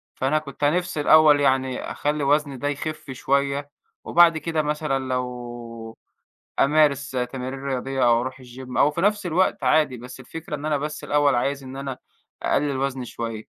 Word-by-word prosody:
فأنا 140 +4 +1
كنت 145 -1 -9
نفسي 175 +1 +1
الأول 150 -1 +6
يعني 130 -2 +1
أخلّي 150 0 -1
وزني 145 -1 +1
ده 145 - -3
يخِف 145 0 -4
شوية، 140 +2 -1 0.3
وبعد 170 -1 +5
كده 160 0 -1
مثلًا 150 -2 -1
لو 120 -3 -5 0.6
أمارس 140 -1 +3
تمارين 130 +1 -4
رياضية، 135 -1 -1
أو 120 0 +4
أروح 130 +2 -5
الGym 125 +1 -9
أو 145 - +5
في 150 - -4
نفس 205 +1 +1
الوقت 180 +3 +1
عادي، 150 -4 +3
بس 125 +2 -10
الفكرة 160 +5 -7
إن 145 - -9
أنا 150 -2 +1
بس 150 +2 -5
الأول 145 -1 +3
عايز 140 +3 -1
إن 130 +1 -8
أنا 135 -2 -5 0.4
أقلِّل 140 -1 +1
وزني 135 -1 -2
شوية. 115 -2 -5
140 Hz, 165 wpm, -23 LUFS, 130-150 Hz, 0.6 s, الأول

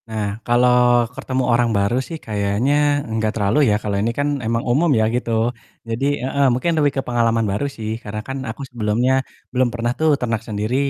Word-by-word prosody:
Nah 105 0 -3
kalau 120 0 +4
ketemu 130 0 -2
orang 120 0 +3
baru 100 +4 +1
sih 165 +5 -7
kayaknya 135 +8 +1
enggak 110 -1 -1
terlalu 110 +7 +3
ya 105 - +3
kalau 100 -2 -2
ini 110 - +1
kan 145 0 +1
emang 115 0 -1
umum 145 +8 +2
ya 110 - +3
gitu. 120 -1 0 0.4
Jadi 115 +4 -1 0.2
heeh, 140 +1 +1
mungkin 165 +8 0
lebih 145 -1 +3
ke - - +2
pengalaman 115 -2 +1
baru 105 +8 -1
sih 110 -5 -6
karena 105 0 -5
kan 135 0 -4
aku 110 - -7
sebelumnya 120 +3 +1 0.3
belum 125 -1 +2
pernah 120 0 -1
tuh 160 0 +3
ternak 115 -3 -2
sendiri. 105 +3 -2
120 Hz, 185 wpm, -20 LUFS, 110-130 Hz, 0.4 s, kalau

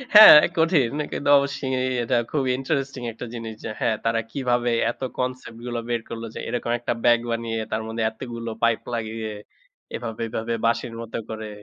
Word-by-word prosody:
হ্যাঁ, 210 -7 +12 0.2
কঠিন। 160 -8 +3 0.2
কিন্তু 145 - -2
অবশ্যই 140 -1 -1 0.3
এটা 120 +1 +1
খুবই 135 -4 +1
interesting 135 -2 -2
একটা 115 - -7
জিনিস 115 -2 -6
যে, - - -3
হ্যাঁ, 110 - +1
তারা 115 0 +2
কিভাবে 120 -2 0 0.2
এত - - -17 0.2
concept 125 -2 -4
গুলো 120 -1 -3
বের 120 -1 0
করল 115 0 -6
যে, - - -5
এরকম 120 -1 -2
একটা 120 - -1
bag 120 -1 +6
বানিয়ে 115 -1 -2
তার 110 - -1
মধ্যে 115 0 -2
এতগুলো 115 0 -6
pipe 115 -1 +2
লাগিয়ে 110 -1 -3 0.6
এভাবে, 115 -2 -5
এভাবে, 110 +1 -3
বাঁশির 115 0 0
মতো 115 -1 -5
করে। 110 -1 -5
120 Hz, 170 wpm, -24 LUFS, 115-130 Hz, 0.6 s, হ্যাঁ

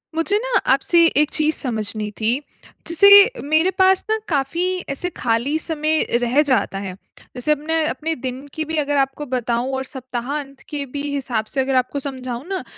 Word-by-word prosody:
मुझे 360 +5 +1
ना - - -4 0.2
आपसे 335 +6 +4
एक 300 0 +4
चीज़ 310 0 +2
समझनी 215 -3 -3
थी, 230 +4 +3 0.5
जैसे 340 +4 +6 0.3
मेरे 310 +5 +2
पास 375 0 +4
न 440 - +2
काफ़ी 295 +3 -1 0.2
ऐसे 280 +6 -2
खाली 240 +5 0
समय 315 -1 0 0.2
रह 245 +4 +2
जाता 205 -6 0
है। 195 -2 -6 0.4
जैसे 250 +4 -1
अपने 310 +2 0
अपने 310 +5 -3
दिन 255 +1 -6
की 315 - -3
भी 320 +1 -4
अगर 290 -1 0
आपको 270 +2 -1
बताऊँ 245 -1 -2
और 265 - -3
सप्ताह 255 -1 -6
अंत 275 -1 -11
कि 290 -2 -4
भी 285 - -3
हिसाब 245 -6 -2
से 270 - +1
अगर 265 0 -1
आपको 255 +2 0
समझाऊँ 260 -2 -6
ना, 385 -1 -4
275 Hz, 180 wpm, -20 LUFS, 250-310 Hz, 0.5 s, जैसे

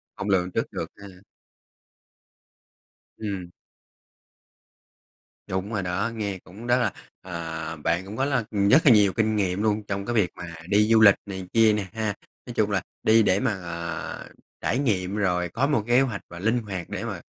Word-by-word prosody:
Hông 100 - -4
lường 90 -2 +2
trước - - -2
được - - -3
ha? 100 0 -11 2.1
Ừm. 95 -5 -5 2.0
Đúng 95 +3 -3
rồi 100 -3 -1
đó, 95 +6 -1
nghe 100 -4 -3
cũng 105 +7 -11
rất 120 +1 +4
là, 120 -5 0 0.3
à, 80 -2 -5
bạn 85 +4 -1
cũng 105 +3 -8
có 135 - +1
là 135 -5 +1
nhất 105 +9 +5
là 130 - +8
nhiều 105 -3 +5
kinh 110 -1 +1
nghiệm 100 0 0
luôn 105 -1 +1
trong 100 0 -3
cái 120 - -2
việc 100 -5 +3
mà 85 -2 -8
đi 105 +1 +4
du 110 -1 +6
lịch 100 -2 +8
này 95 -2 -6
kia 110 -2 +5
nè 105 -2 -1
ha? 110 -2 -1 0.3
Nói - - -7
chung - - +1
là - - +1 0.2
đi 110 0 +5
để 95 0 +3
mà, 125 -4 +1
à, 85 -1 -5 0.4
trải 125 - 0
nghiệm 100 -7 0
rồi 90 -4 0
có 130 +10 0
một 120 -8 +1
kế 120 +2 +5
hoạch 120 -7 -1
và 85 - -9
linh 110 +5 +2
hoạt 95 -4 -5
để - - -4
mà - - -5
100 Hz, 185 wpm, -25 LUFS, 90-110 Hz, 2.1 s, là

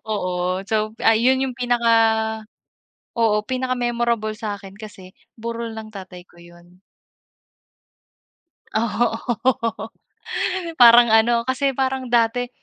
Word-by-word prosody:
Oo, 185 -2 -2
so 215 0 -1
ay, 225 -1 +5
'yun 260 +1 +3
'yung 255 -2 -4
pinaka 240 -2 +1 1.3
oo, 215 -2 +2
pinaka-memorable 240 -4 -1
sa'kin 205 -2 -7
kasi 195 -4 -12 0.2
burol 230 0 -5
ng 215 0 -9
tatay 185 -2 -10
ko - - -24
'yun. 175 +1 -18 1.9
Oo, 230 +2 0 1.7
parang 240 0 +8
ano, 235 +1 +3
kasi 265 +1 0
parang 265 -1 -2
dati 240 +1 +1
230 Hz, 100 wpm, -21 LUFS, 205-245 Hz, 1.9 s, parang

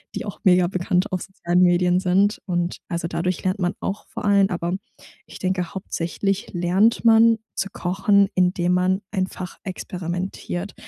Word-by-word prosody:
die - - -4
auch 205 - -7
mega 180 -1 +5
bekannt 180 +1 0
auf 185 -1 -2
sozialen 180 -2 0
Medien 180 0 +4
sind. 195 +3 +2
Und, 175 -2 -1
also 170 -2 -3
dadurch 170 +2 -2
lernt 185 +2 0
man 180 -1 0
auch 195 +2 -4
vor - - -7
allem, 200 -1 +4
aber 175 0 -2 0.5
ich - - -12
denke, 185 -2 -2
hauptsächlich 190 +2 -2
lernt 185 +6 +2
man 225 0 +6 0.2
zu 195 - -2
kochen, 195 +2 +2
indem 180 -1 +2
man 185 +2 +2
einfach 185 -2 -4
experimentiert 180 0 -5
185 Hz, 155 wpm, -23 LUFS, 175-195 Hz, 0.5 s, man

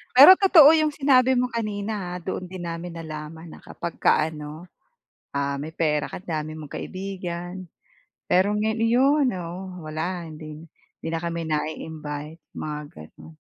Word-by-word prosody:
Pero 290 +9 +11
totoo 350 -7 +8
yung 310 -1 +1
sinabi 260 -3 +4
mo 250 0 +1
kanina 210 -4 -3
ah, - - -5
doon 185 +1 -4
din 185 0 -8
namin 170 +1 -6
nalaman 160 0 -8
na - - -11
kapagka 160 -2 0
ano, 155 +3 -9 0.6
ah, 140 0 -1
may 145 +3 -5
pera 150 -2 0
ka - - -6
dami 155 -3 -4
mong 150 -2 -9
kaibigan. 185 -1 -5 0.7
Pero 195 +3 +4
ngay 220 +1 0
ayun 265 +5 +4
oo 180 0 -7
wala 160 +3 -3
hindi 155 -1 -9 0.4
hindi - - -4
na 165 - -1
kami 170 0 -3
nai-invite, 155 0 -4 0.2
mga 150 -1 -4 0.2
ganun. 80 - -13
170 Hz, 145 wpm, -24 LUFS, 155-205 Hz, 0.7 s, Pero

